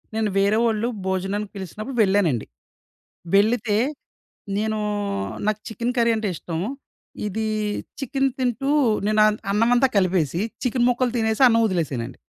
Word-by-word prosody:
నేను 220 -1 +1
వేరేవాళ్ళు 215 +3 +2 0.2
భోజనానికి 195 +2 -2
పిలిసినప్పుడు 215 +7 -6
వెళ్ళానండి. 190 - +2 0.9
వెళ్ళితే 215 +1 +3 0.8
నేను 215 +1 -1 0.7
నాకు 215 0 +1
చికెను 235 +3 -2
కర్రీ 235 -1 +4
అంటే 220 -1 -2
ఇష్టం. 165 0 -5 0.7
ఇది 220 +2 -2 0.5
చికెను 270 0 0
తింటూ 255 +1 -1 0.4
నేను 215 0 +2
అన్ 210 0 +1
అన్నమంతా 240 +5 +4
కలిపేసి 180 -3 +1 0.2
చికెను 250 -1 +1
ముక్కలు 245 0 +1
తినేసి 220 +1 0
అన్నం 230 -1 +4
ఒదిలేసానండి. 135 - -3
215 Hz, 115 wpm, -23 LUFS, 195-235 Hz, 0.9 s, కర్రీ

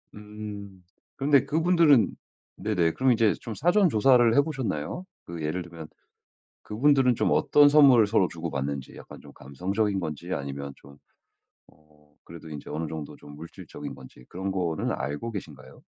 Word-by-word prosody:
음 105 -2 -9 0.3
그런데 140 0 +3
그분들은 160 - +3 0.5
네네. 90 -6 0
그럼 130 +5 +1
이제 110 -2 +2
좀 115 -3 -7
사전 175 +4 +3
조사를 120 0 +4
해 140 - +6
보셨나요? 135 - -4 0.2
그 85 -2 -8
예를 85 +4 -3
들면 85 -2 -11 0.8
그분들은 130 +2 +2
좀 - - 0
어떤 145 0 +5
선물을 135 -7 +6
서로 100 -4 +2
주고받는지 70 -5 -5
약간 - - -12
좀 - - -15
감성적인 95 +9 -2
건지 75 -4 -5
아니면 70 0 -5
좀 70 +1 -17 0.7
어 75 -1 -27
그래도 85 -1 -12
인제 75 -2 -9
어느 80 +1 -3
정도 75 -2 -7
좀 75 0 -14
물질적인 80 +3 -9
건지 65 -1 -15
그런 95 +2 -4
거는 85 -4 -2
알고 75 - -4
계신가요? 75 -10 -10
95 Hz, 325 characters per minute, -26 LUFS, 75-125 Hz, 0.8 s, 해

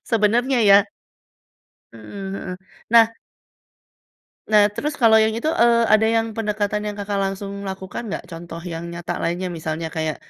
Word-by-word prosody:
sebenernya 240 +4 +2
ya. 200 - +9 1.2
Mmm, 195 - -8
heeh, 180 -2 -6 0.3
nah 230 -1 +7 1.4
Nah, 210 -1 +6
terus 295 +7 -3
kalau 220 -1 +6
yang 220 0 +1
itu, 270 - -3
eee, 235 0 +5 0.2
ada 220 +1 +5
yang 225 0 +1
pendekatan 210 -1 -1
yang 205 - -4
Kakak 200 0 -3
langsung 195 +1 -4 0.2
lakukan, 190 +4 -6
nggak? - - -4
Contoh 165 0 -8
yang 165 +1 -5
nyata 170 0 -5
lainnya, 175 +2 -1
misalnya 160 +1 -4
kayak 155 -1 -1
205 Hz, 145 wpm, -21 LUFS, 175-225 Hz, 1.4 s, ya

